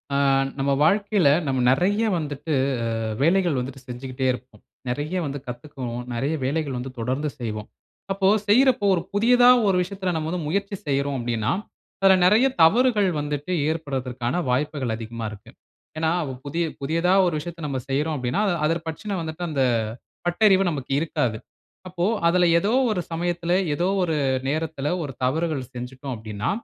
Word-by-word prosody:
ஆ - - +3 0.4
நம்ம 140 +1 +1
வாழ்க்கையில 200 -1 +3 0.2
நம்ம 130 -2 0
நிறைய 195 +10 +2
வந்துட்டு, 150 0 -4 0.5
ஆ - - -3 0.2
வேலைகள் 175 -1 +3
வந்துட்டு 130 +2 -5
செஞ்சுகிட்டே 130 +1 -4
இருப்போம். 125 -4 -11 0.3
நிறைய 145 +8 -2
வந்து 140 -1 -3
கத்துக்குவோம், 125 -1 -6
நிறைய 135 +7 -1
வேலைகள் 140 -1 -1
வந்து 130 +2 -5
தொடர்ந்து 130 +6 -1
செய்வோம். 110 -3 -5 0.4
அப்போ, 195 0 +2 0.2
செய்யிறப்போ 255 +1 +4
ஒரு 175 - 0
புதியதா 245 +4 +5 0.2
ஒரு 190 - +3
விஷயத்தில 185 0 -3
நம்ம 160 -1 -2
வந்து 175 -2 -3
முயற்சி 200 +4 -1
செய்றோம் 140 0 0
அப்பிடின்னா, 115 -2 -1 0.5
அதில 195 0 +6
நிறைய 215 +8 +5 0.2
தவறுகள் 215 +3 +4
வந்துட்டு 145 +3 -3 0.2
ஏற்பட்றதற்கான 130 -5 -3
வாய்ப்புகள் 130 -2 -1
அதிகமா 115 0 -6
இருக்கு, 105 -2 -12 0.5
ஏனா, 160 0 +1 0.3
புதிய, 165 +4 -1 0.2
புதியதா 165 +6 +1
ஒரு 175 - 0
விஷயத்த 170 +2 -8
நம்ம 135 -2 -2
செய்றோம் 150 +3 0
அப்பிடின்னா, 130 +8 -1
அத, 195 - +2
அதப் 165 +1 -1
பற்றின 195 +6 -4
வந்துட்டு 160 +2 -5
அந்த 140 -3 0 0.6
பட்டறிவு 195 +2 +4
நமக்கு 140 -4 -5
இருக்காது. 125 -8 -1 0.5
அப்போ, 175 -1 -2 0.2
அதில 175 0 +4
ஏதோ 205 +5 0 0.2
ஒரு 185 - -1
சமயத்தில 175 +1 -1 0.2
ஏதோ 175 +5 0 0.2
ஒரு 165 -3 0 0.3
நேரத்தில 155 -1 -2
ஒரு 145 -3 -5
தவறுகள் 155 +1 0
செஞ்சுட்டோம் 130 +2 -6
அப்பிடின்னா, 110 -1 -3
155 Hz, 150 wpm, -24 LUFS, 130-180 Hz, 0.6 s, அதில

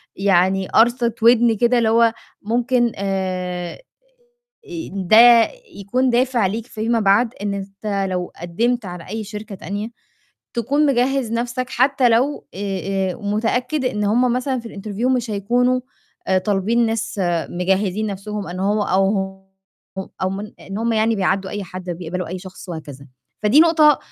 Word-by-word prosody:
يعني 190 0 +2
قَرصِة 235 0 +3
وِدْن 235 -1 +5
كده 240 +3 +3
اللي 225 -2 +2
هو 230 0 +4 0.3
ممكن 240 +2 +1
آآ، 185 -2 -3 1.0
آآ 335 -2 -6
ده 195 +3 +4 0.6
يكون 250 +6 0
دافع 245 -3 +2
ليك 220 +4 -3
فيما 225 +1 -1
بعد 215 +4 +3
إن 205 -1 -1
أنت 195 0 -3
لو 180 -1 -3
قدِّمت 225 +7 -1
على 175 -1 -8
أي 220 +1 -4
شركة 210 0 -8
تانية 205 +4 -5 0.7
تكون 280 +6 +1
مجهِّز 260 -2 +1
نَفْسك 240 +2 -2
حتّى 260 0 +3
لو 255 +6 +1
آآ، 195 -1 -2
آآ - - -9
متأكد 245 +7 -1
إن 210 -4 -1
هم 240 +4 +2
مثلًا 255 +1 -1
في 230 - -9
الinterview 210 +3 -4
مش 240 -2 -3
هيكونوا 245 +5 +1 0.5
آآ 190 - +3
طالبين 210 +5 +1
ناس 225 -2 -2 0.3
مجهّزين 190 +3 0
نَفْسهم 205 0 -5
أن 180 +1 -5
هو 205 +2 +1
أو 195 -1 +2
ه 190 0 -5 0.5
ه 190 - -5
أو 185 - +1
من 205 +2 -6
إن 195 +2 -6
هم 230 +1 0
يعني 220 +1 +2
بيعدّوا 190 0 0
أي 205 -1 -4
حد 185 0 -9
أو 175 - -2
بيقبلوا 180 +1 -5
أي 185 +2 -5
شخص 185 0 -11
وهكذا. 145 -4 -8 0.4
فدي 220 +8 +5
نقطة 315 -3 +5
210 Hz, 155 wpm, -20 LUFS, 190-240 Hz, 1.0 s, وِدْن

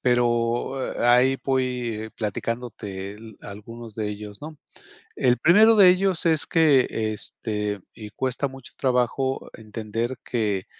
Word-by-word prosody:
pero, 120 +1 +1
eh, - - -2
a 120 0 +6
ahí 130 +2 +3
voy 125 -4 -1
platicándote 105 -3 -4
el 110 -1 -13
algunos 110 +2 -10
de 105 -1 -2
ellos, 105 0 -8
¿no?, 155 +1 -8 0.6
el 125 -1 +3
primero 215 - +6
de 190 -3 +8
ellos 185 -1 +1
es 160 -3 +3
que, 150 -6 +4
este, 105 -1 -2
y 105 -2 -9
cuesta 130 +4 -2
mucho 135 -2 -13
trabajo 130 +1 0
entender 115 +3 -4
que 105 -6 -1
120 Hz, 135 wpm, -24 LUFS, 110-130 Hz, 0.6 s, de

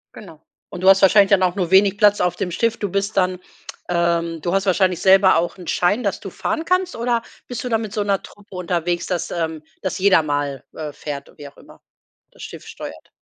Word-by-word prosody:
Genau, 165 -7 -12 0.3
und 180 -2 -8
du 190 - +5
hast 195 0 +6
wahrscheinlich 200 +1 +5
dann 195 - +5
auch 180 +1 +1
nur 180 -3 -2
wenig 195 +1 +5
Platz 205 -1 +4
auf 180 -1 +1
dem 180 -1 -3
Schiff. 230 +5 0
Du 205 - -3
bist 200 +3 -2
dann, 185 -1 +1 0.5
ähm 170 -1 0
du 175 +4 -2
hast 195 0 +1
wahrscheinlich 185 -1 +2
selber 190 -2 +5
auch 170 +3 -2
'n 180 - -11
Schein, 205 +7 +1
dass 200 - -1
du 195 - -8
fahren 320 - -3
kannst 365 +1 0
oder 235 0 -1 0.2
bist 245 -2 -5
du 250 - -4
da 225 -2 +1
mit 215 -2 -6
so 210 - -1
'ner 200 -1 0
Truppe 205 -1 -15
unterwegs, 175 -1 -2
dass, 180 -2 -3
ähm 160 -2 -3 0.2
dass 190 - -3
jeder 190 -3 +4
mal, 145 -3 -3
äh, 150 -2 -6
fährt 140 -2 -7
u - - -19
wie 145 - -9
auch 140 - -17
immer, - - -17 0.5
das - - -13
Schiff - - -10
steuert? - - -10
190 Hz, 230 wpm, -20 LUFS, 170-205 Hz, 0.5 s, hast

